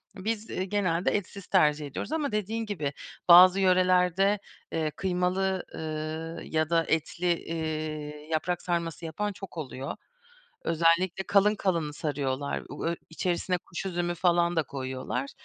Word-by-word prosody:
Biz 220 +3 -3 0.2
genelde 185 -4 +1
etsiz 200 -1 -4
tercih 150 -5 +3
ediyoruz 140 - -5
ama 300 -6 0
dediğin 215 +2 -1
gibi, 155 -9 -3 0.4
bazı 185 +2 +9
yörelerde, 185 +1 +4 0.3
eee, 160 -2 -1
kıymalı, 185 +1 0
eee, 160 +1 -5
ya 155 0 +1
da 165 -1 +3
etli, 160 +3 -1 0.2
eee, 155 -2 -4
yaprak 175 +3 0
sarması 170 -2 -2
yapan 205 +6 -2
çok 190 -3 -10
oluyor. 135 -2 -5 0.7
Özellikle 170 +3 +2
kalın 205 +1 +5
kalın 170 -7 0
sarıyorlar. 140 -2 -2
U 145 - -6
ö 170 - +1 0.2
içerisine 180 +2 -1
kuş 175 +3 -6
üzümü 175 -1 -1
falan 175 0 +2
da 160 - +4
koyuyorlar. 130 -1 -4
170 Hz, 130 wpm, -28 LUFS, 155-190 Hz, 0.7 s, bazı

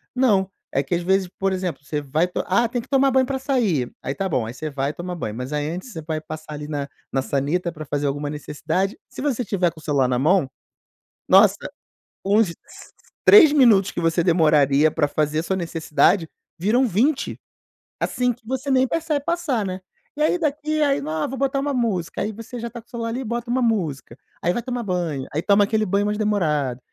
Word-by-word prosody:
não, 205 -7 +3 0.2
é 135 - +1
que 140 +5 -2
às 175 - -2
vezes, 190 +1 +2
por 195 0 0
exemplo, 185 -5 -3
você 150 +1 -3
vai 150 +5 0
to 180 - -3
"Ah, 235 +6 +3
tem 240 +1 -3
que - - -16
tomar 275 -1 +3
banho 260 0 +3
pra 270 0 -1
sair.", 225 - 0
aí 135 - -4
tá 195 - -1
bom, 125 -10 -1
aí 115 - -6
você 155 +3 -5
vai 140 +1 -1
tomar 180 +2 -6
banho, 110 -10 -4
mas 125 +4 -5
aí 150 +1 -1
antes 185 +9 -6
você 160 - -6
vai 155 0 -3
passar 155 0 -8
ali 150 0 -6
na 145 -2 -4 0.2
na 135 - +1
sanita 150 +7 -1
pra 155 -2 -8
fazer 145 0 -1
alguma 145 +1 -2
necessidade. 155 +6 -2
Se - - -9
você 265 -4 0
estiver 190 -5 +1
com 160 - -15
o - - -16
celular 140 -4 +2
na 125 -1 0
mão, 155 +2 +3 0.8
nossa, - - +7 0.7
uns 205 0 +3
s 170 - -8 0.7
3 335 -8 +8
minutos 225 -9 +5
que - - -4
você 165 +1 +2
demoraria 155 -3 +4
pra 150 -2 +1
fazer 150 +1 0
a - - -2
sua 190 - -1
necessidade, 165 0 +1 0.3
viram 225 +9 +3
20, 250 - 0 0.6
assim 250 -1 0
que 225 -1 -23
você 265 +2 -2
nem 260 0 +4
percebe 310 0 -1
passar, 295 -10 -1
né, 185 0 -4 0.4
e - - -3
aí 355 +3 +2
daqui 305 0 -1
aí 285 -1 +2
"Não 155 - -5
ah 155 -1 -1
vou 270 - -6
botar 275 +1 0
uma 285 +1 -1
música.", 220 -9 -1
aí 215 - -1
você 230 +3 -8
já 235 +1 -4
tá 235 0 -9
com 230 - -37
o - - -32
celular 230 -2 -4
ali 235 +3 -3
e - - -4
bota 235 +1 -3
uma 255 +1 +1
música, 165 - -1 0.2
aí 175 - +1
vai 240 - -3
tomar 245 -1 -3
banho, 170 -9 -2
aí 155 - 0
toma 205 0 +4
aquele 215 +1 0
banho 200 +1 +1
mais 210 0 -1
demorado, 150 - 0
185 Hz, 225 wpm, -22 LUFS, 155-240 Hz, 0.8 s, 3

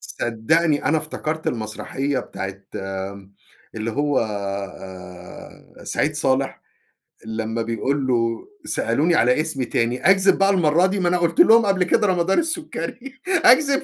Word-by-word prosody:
صدّقني 145 +7 0
أنا 155 +4 +2
افتكرت 155 +1 -5
المسرحية 125 +5 -3
بتاعة 95 0 -6 0.2
آآ، 95 0 -6 0.4
اللي 110 +1 -3
هو 145 +3 0
آآ، 100 -3 -7
آآ - - -13
سعيد 155 +1 -1
صالح 135 -2 -1 0.6
لمّا 110 +1 -3
بيقول 130 +5 -1
له: 115 -2 0 0.2
"سألوني 160 - +1
على 125 +3 +3
اسمي 155 -5 -3
تاني 120 +7 0
أكذب 195 0 +4
بقى 195 0 +3
المرّه 175 -2 +3
دي؟ 195 +1 -1
ما 180 - +1
أنا 180 - +2
قُلت 170 - -1
لهم 230 -9 +7
قبل 195 -2 +2
كده 210 +4 +2
رمضان 185 0 +2
السكري، 275 - -4
أكذب؟" 280 -6 +4
145 Hz, 140 wpm, -22 LUFS, 110-180 Hz, 0.6 s, لهم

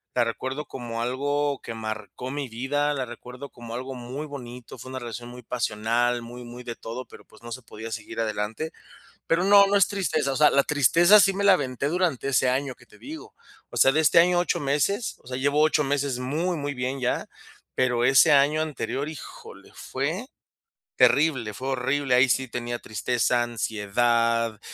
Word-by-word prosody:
la - - +4
recuerdo 130 +5 -4
como 115 -3 -6
algo 145 +3 -1
que 115 - -6
marcó 110 +2 -6
mi 140 -3 -4
vida, 145 +5 -1
la 130 -2 -2
recuerdo 125 +3 -10
como 120 -1 -9
algo 130 +2 -5
muy 130 +5 -6
bonito. 125 -4 -9
Fue 130 - -9
una 130 - -6
relación 120 0 -7
muy 125 0 -11
pasional, 120 +1 0
muy, 120 +1 -9
muy 120 +1 -10
de 120 -1 -6
todo, 120 +3 -7
pero - - -15
pues - - -20
no 120 - -9
se 130 - -7
podía 115 0 -9
seguir 115 +1 -6
adelante. 110 +7 -2 0.6
Pero 165 +2 +2
no, 200 0 +7
no 200 +1 +2
es 195 - +5
tristeza, 160 -8 -1
o - - -2
sea, 150 0 +6
la 140 - +4
tristeza 170 +9 +5
sí 195 - +4
me 200 - -2
la 195 -2 +7
aventé 140 -2 -2
durante 165 -6 0
ese 130 -1 +2
año 130 0 -1
que 120 - -20
te - - -19
digo. 315 +3 -10 0.4
O - - -10
sea, 135 - +6
de 155 - +2
este 160 +2 +6
año 175 +1 +3
8 175 -4 0
meses, 150 - 0
o - - -23
sea, 125 0 -4
llevo 145 +3 +1
8 155 0 +3
meses 140 -2 -1
muy, 165 +7 -1
muy 145 -1 -3
bien 130 +2 -3
ya. 125 - -1 0.5
Pero 125 -2 +1
ese 135 +4 +6
año 145 +3 +4
anterior, 150 -1 -3
híjole, 155 - -11
fue 160 - -3 0.7
terrible, 135 -8 +3
fue 130 +1 -4
horrible. 135 +1 0
Ahí 130 +1 +5
sí 130 +1 +1
tenía 120 0 -4
tristeza, 120 +3 0
ansiedad, 115 0 0
130 Hz, 190 wpm, -25 LUFS, 120-145 Hz, 0.7 s, no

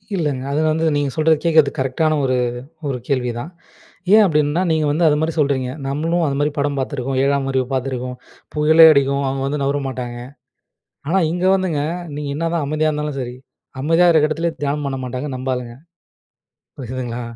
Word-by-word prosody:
இல்லைங்க, 145 -7 -1
அது 150 +2 +1
வந்து 160 +1 0
நீங்க 145 -1 0
சொல்றது, 155 0 +3
கேக்கிறது 160 -4 +4
கரெக்ட்டானா 135 +4 +1
ஒரு 130 -1 +1 0.5
ஒரு 135 -3 -2
கேள்விதான். 125 +1 -2 0.6
ஏன் 215 0 +8
அப்படின்னா, 150 -1 +1
நீங்க 160 -1 +1
வந்து 160 +3 +1
அது 150 - +4
மாரி 160 +1 0
சொல்றீங்க. 140 -4 +1 0.2
நம்மளும் 165 +5 0
அதுமாரி 145 +2 0
படம் 140 0 0
பாத்துருக்கோம். 135 -1 -2
7ஆம் 140 0 +1
அறிவு 130 -1 +1
பாத்துருக்கோம். 130 -1 -3 0.4
புயலே 155 +2 +6
அடிக்கும் 140 -1 +2
அவுங்க 135 0 -2
வந்து 145 +1 -2
நவுர 140 +1 0
மாட்டாங்க. 125 -2 -5 0.9
ஆனா 185 +4 +2
இங்க 180 +1 -2
வந்துங்க 180 -6 0 0.3
நீங்க 145 0 -4
என்னாதான் 165 +1 -1
அமைதியா 155 +2 0
இருந்தாலும் 150 -2 -3
சரி, 125 -1 -5 0.5
அமைதியா 165 +5 +3
இருக்க 155 -2 +4
எடத்துல 165 +2 -1
தியானம் 145 +1 -1
பண்ண 135 -1 -2
மாட்டாங்க 125 +3 -4
நம்ப 130 +1 -5
ஆளுங்க. 120 -2 -6 1.0
புரிதுங்களா? 125 -2 -5
145 Hz, 160 wpm, -19 LUFS, 130-155 Hz, 1.0 s, ஏன்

